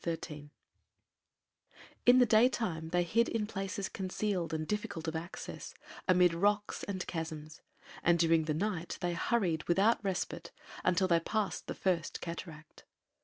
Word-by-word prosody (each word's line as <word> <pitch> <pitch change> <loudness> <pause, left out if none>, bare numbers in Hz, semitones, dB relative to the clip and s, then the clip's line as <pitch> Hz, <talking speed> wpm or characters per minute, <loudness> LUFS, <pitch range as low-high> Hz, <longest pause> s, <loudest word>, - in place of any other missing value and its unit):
XIII 150 -3 -4 1.6
In 245 +1 +9
the 250 - +7
daytime 215 -8 +2
they 175 +1 +2
hid 230 +7 +2
in 225 -2 -1
places 195 -2 -3
concealed 185 -2 -2
and 155 -1 -2
difficult 190 -6 -3
of 160 - -2
access, 170 +3 -6 0.3
amid 180 -2 +5
rocks 205 +4 +1
and 190 -2 -3
chasms, 160 -2 -5 0.4
and 175 0 +4
during 165 -1 +3
the 155 -1 0
night 180 -2 -2
they 175 -1 -1
hurried, 170 -3 0
without 205 +6 +3
respite, 170 -3 -3 0.3
until 185 +1 +3
they 170 -2 +4
passed 210 +4 -2
the - - -4
First 175 -4 -1
Cataract. 165 -2 -8
175 Hz, 140 wpm, -32 LUFS, 165-205 Hz, 1.6 s, In